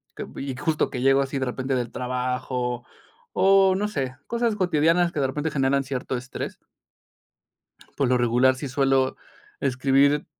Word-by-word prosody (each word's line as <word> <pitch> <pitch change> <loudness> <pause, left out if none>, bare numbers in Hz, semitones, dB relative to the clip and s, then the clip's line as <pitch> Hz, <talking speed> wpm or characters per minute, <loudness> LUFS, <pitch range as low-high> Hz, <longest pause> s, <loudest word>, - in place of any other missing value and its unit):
cop - - -8
y 135 -1 -4
justo 150 +3 0
que 125 - -4
llego 135 +1 +4
así 135 0 -2
de 130 - -1
repente 130 +2 -3
del 120 -2 -2
trabajo 125 -1 -3 0.5
o 195 0 +5
no 205 +2 0
sé, 135 -9 -3
cosas 235 -2 0
cotidianas 175 -2 +2
que 155 - -3
de 135 - +2
repente 150 +4 -3
generan 140 -1 +1
cierto 130 -1 -3
estrés. 125 +1 -6 1.4
Por 140 - +1
lo 125 - +3
regular 125 +2 +3
sí 140 +2 -5
suelo 135 0 +1 0.4
escribir, 140 +2 +2
135 Hz, 155 wpm, -24 LUFS, 130-150 Hz, 1.4 s, o